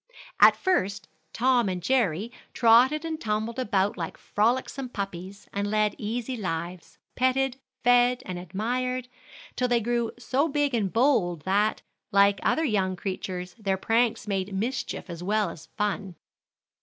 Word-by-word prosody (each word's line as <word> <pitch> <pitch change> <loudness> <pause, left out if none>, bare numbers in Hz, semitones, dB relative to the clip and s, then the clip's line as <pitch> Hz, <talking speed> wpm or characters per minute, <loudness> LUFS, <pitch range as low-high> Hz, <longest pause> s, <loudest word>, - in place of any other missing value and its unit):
At - - +8
first, 200 - 0 0.2
Tom 245 -3 +2
and 180 -1 -2
Jerry 210 0 0 0.2
trotted 255 +7 +5
and 320 -1 -4
tumbled 220 +3 -2
about 205 -5 +1
like 165 -2 -5
frolicsome 250 +4 -1
puppies, 195 -2 -6
and 200 0 -1
led 215 -1 +2
easy 235 +4 -3
lives, 175 -4 -5 0.2
petted, 260 0 +1 0.3
fed 245 0 +4
and 180 -1 -5
admired, 250 +8 -2 0.5
till 250 - +1
they 240 -1 +3
grew 235 0 -1
so 260 +5 0
big 290 -2 0
and 205 -5 0
bold 220 - +2
that, 205 +3 +1 0.3
like 200 0 +4
other 320 - +1
young 195 -7 0
creatures, 180 -1 -5
their 195 -3 0
pranks 225 +2 +1
made 195 -1 -2
mischief 235 +4 -3
as 170 -2 -7
well 205 0 0
as 160 -1 -12
fun. 205 -3 -2
215 Hz, 145 wpm, -26 LUFS, 190-250 Hz, 0.5 s, At